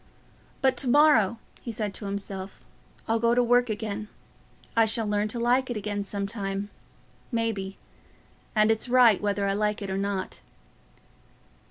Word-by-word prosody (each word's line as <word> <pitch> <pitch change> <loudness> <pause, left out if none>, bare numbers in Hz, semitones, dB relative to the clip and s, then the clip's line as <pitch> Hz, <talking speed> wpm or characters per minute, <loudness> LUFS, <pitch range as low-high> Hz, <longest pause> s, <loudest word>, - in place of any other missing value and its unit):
"But 265 - +3
to 270 - 0
morrow," 245 -6 +5 0.2
he 235 - -5
said 210 -2 -3
to 205 - -5
himself, 195 -1 -4 0.4
"I'll 225 0 +1
go 235 +1 +3
to 245 - +4
work 245 0 +3
again. 215 -1 -4 0.7
I 225 -1 +5
shall 220 +1 -1
learn 210 0 0
to 235 +3 -5
like 250 +2 +2
it 240 - -2
again 205 -1 -3
some 200 0 -4
time, 200 -1 -4 0.6
maybe; 220 -5 -2 0.8
and 215 +1 +4
it's 225 +3 -1
right 245 -5 +5
whether 205 -1 0
I 195 - +1
like 210 +1 0
it 200 -2 -5
or 190 - -1
not." 200 -1 -3
215 Hz, 160 wpm, -27 LUFS, 200-235 Hz, 0.8 s, morrow